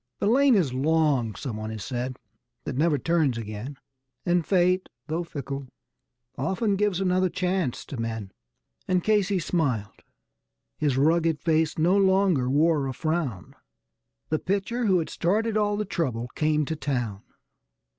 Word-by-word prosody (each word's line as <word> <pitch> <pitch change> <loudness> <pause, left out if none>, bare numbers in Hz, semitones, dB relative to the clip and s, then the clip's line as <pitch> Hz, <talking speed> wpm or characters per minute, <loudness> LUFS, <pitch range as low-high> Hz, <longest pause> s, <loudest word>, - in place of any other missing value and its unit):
The - - -2
lane 260 +4 +5
is 160 -11 +2
long, 140 -5 +1
someone 110 -3 -5
has 110 -2 -6
said, 125 +1 -3 0.5
that 130 - -4
never 150 +2 +2
turns 150 -3 +1
again, 110 +5 -6 0.5
And 175 -1 +2
Fate, 185 +1 +2 0.2
though 165 +3 -2
fickle, 140 -4 -6 0.7
often 190 - 0
gives 200 -2 +1
another 185 -1 +2
chance 180 -6 -1
to 135 - -7
men. 110 -4 -4 0.6
And 180 -1 +1
Casey 205 -2 +2
smiled 140 - -1 0.8
his 145 -4 +1
rugged 160 +2 +3
face 160 -1 +1
no 170 +4 +3
longer 190 -9 +3
wore 150 0 +3
a 130 - -3
frown; 145 - -2 0.8
The 155 - +1
pitcher 205 +5 -1
who 190 -2 +4
had 165 - -2
started 215 +5 0
all 205 -1 +1
the 210 - -1
trouble 125 - -2
came 150 +2 +1
to 160 - -3
town. 120 -9 -2
160 Hz, 145 wpm, -26 LUFS, 130-185 Hz, 0.8 s, lane